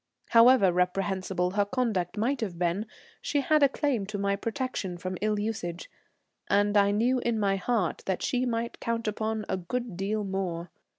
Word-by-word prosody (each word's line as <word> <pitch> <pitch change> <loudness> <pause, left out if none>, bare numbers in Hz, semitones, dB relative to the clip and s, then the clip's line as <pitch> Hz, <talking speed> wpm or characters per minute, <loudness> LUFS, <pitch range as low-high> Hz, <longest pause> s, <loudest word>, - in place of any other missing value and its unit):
However 230 -4 +6
reprehensible 180 0 0
her 205 +1 +2
conduct 210 -5 -1
might 250 +5 0
have 190 -6 -3
been, 180 +5 -1 0.3
she 290 - 0
had 305 +1 +3
a 280 - +6
claim 265 -8 -1
to 210 0 -4
my 200 0 +1
protection 225 -5 -3
from 185 +1 -4
ill 210 0 +1
usage, 205 -5 -4 0.6
and 205 +1 +3
I 200 -1 +5
knew 235 +5 +2
in 235 -2 0
my 195 -1 +2
heart 200 -3 -1
that 190 -2 -1
she 250 0 0
might 235 0 -2
count 230 -1 -2
upon 215 0 -2
a - - -1
good 230 +4 -4
deal 210 +2 -1
more. 180 -4 -3
205 Hz, 175 wpm, -28 LUFS, 190-230 Hz, 0.6 s, However